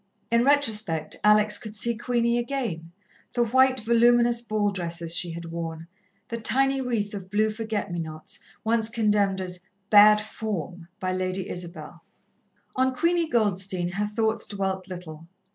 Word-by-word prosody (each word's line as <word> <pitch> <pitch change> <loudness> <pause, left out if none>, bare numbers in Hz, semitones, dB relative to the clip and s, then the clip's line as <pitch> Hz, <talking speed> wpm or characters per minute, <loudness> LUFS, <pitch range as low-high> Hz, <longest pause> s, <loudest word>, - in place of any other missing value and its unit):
In 235 0 +4
retrospect 220 - 0
Alex 210 0 +4
could 215 -2 -8
see 235 +3 +1
Queenie 235 0 +1
again, 235 -11 -3 0.4
the 240 - +2
white, 260 +2 +3
voluminous 235 +1 +4
ball 215 -3 0
dresses 170 -3 -3
she 175 - +2
had 170 0 -7
worn, 165 -1 -5 0.4
the 230 - -3
tiny 270 +3 +2
wreath 225 -5 -2
of 190 -2 -7
blue 215 +2 +2
forget 215 -3 -3
me 175 - -2
nots, 155 -1 -7 0.2
once 225 0 +1
condemned 210 -4 +1
as 180 -1 -6 0.3
"bad 210 0 +8
form" 185 -6 -5
by 185 0 -1
Lady 185 0 -2
Isabel. 170 -2 -8 0.7
On 260 0 +1
Queenie 335 +3 +1
Goldstein 190 -5 0
her 200 +4 -2
thoughts 220 +1 -1
dwelt 190 -2 -3
little. 165 -3 -9
210 Hz, 145 wpm, -26 LUFS, 180-235 Hz, 0.7 s, bad